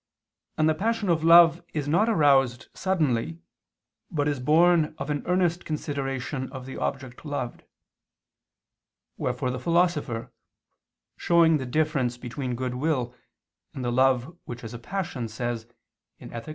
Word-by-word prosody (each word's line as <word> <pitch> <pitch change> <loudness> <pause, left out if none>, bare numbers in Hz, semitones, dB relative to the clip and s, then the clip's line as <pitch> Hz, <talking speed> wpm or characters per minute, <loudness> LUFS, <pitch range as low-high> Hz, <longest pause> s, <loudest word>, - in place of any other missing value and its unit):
And 155 - +3
the 155 - +4
passion 220 +4 -1
of 165 -2 +2
love 165 0 +7
is 145 -2 -2
not 175 +10 +3
aroused 135 - +3
suddenly, 140 - 0 0.7
but 145 -2 -1
is 145 -2 -1
born 160 +3 +3
of 150 - -4
an 145 - -1
earnest 180 -1 +1
consideration 135 -3 -3
of 130 -2 -8
the 130 - -8
object 130 -2 -4
loved; 145 -5 -5 1.5
wherefore 125 - -2
the 125 - -4
Philosopher, 165 -6 0 0.8
showing 165 -2 +4
the 130 -3 -5
difference 135 -4 0
between 125 +1 -4
goodwill 125 0 -1 0.6
and 130 - -4
the 120 - 0
love 130 +4 +2
which 120 0 -8
is 115 +1 -7
a 120 - -7
passion, 170 -6 -4
says 115 +1 -4 0.5
(Ethic. 115 +5 -8
145 Hz, 135 wpm, -26 LUFS, 125-165 Hz, 1.5 s, love